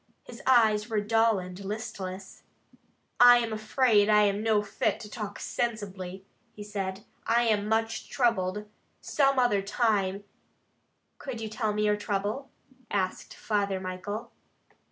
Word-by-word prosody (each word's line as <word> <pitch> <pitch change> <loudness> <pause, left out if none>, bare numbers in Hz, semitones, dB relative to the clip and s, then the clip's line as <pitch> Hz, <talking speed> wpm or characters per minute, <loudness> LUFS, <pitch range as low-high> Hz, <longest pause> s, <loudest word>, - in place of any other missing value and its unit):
His - - -11
eyes 220 -4 +4
were 220 -2 +1
dull 225 +1 +3
and 185 +1 -7
listless. 195 -2 -6 0.8
"I 245 0 +9
am 230 -2 -1
afraid 215 -1 +2
I 210 0 +6
am 200 0 +1
no 215 -2 +2
fit 205 - -1
to 210 - -9
talk 205 -2 -6
sensibly," 195 -5 -4 0.3
he 210 - -9
said. 195 -1 -5 0.2
"I 235 +1 +3
am 210 -2 +1
much 225 0 -1
troubled. 210 -5 0 0.3
Some 275 -2 +1
other 245 -6 +3
time 200 -2 0 0.5
" - - -46
"Could 260 -4 -6
you 220 -1 -5
tell 215 0 -1
me 210 0 0
your 210 0 +2
trouble?" 210 +6 -3 0.4
asked 190 -2 -2
Father 200 -3 -1
Michael. 205 +5 -5
210 Hz, 140 wpm, -28 LUFS, 200-225 Hz, 0.8 s, I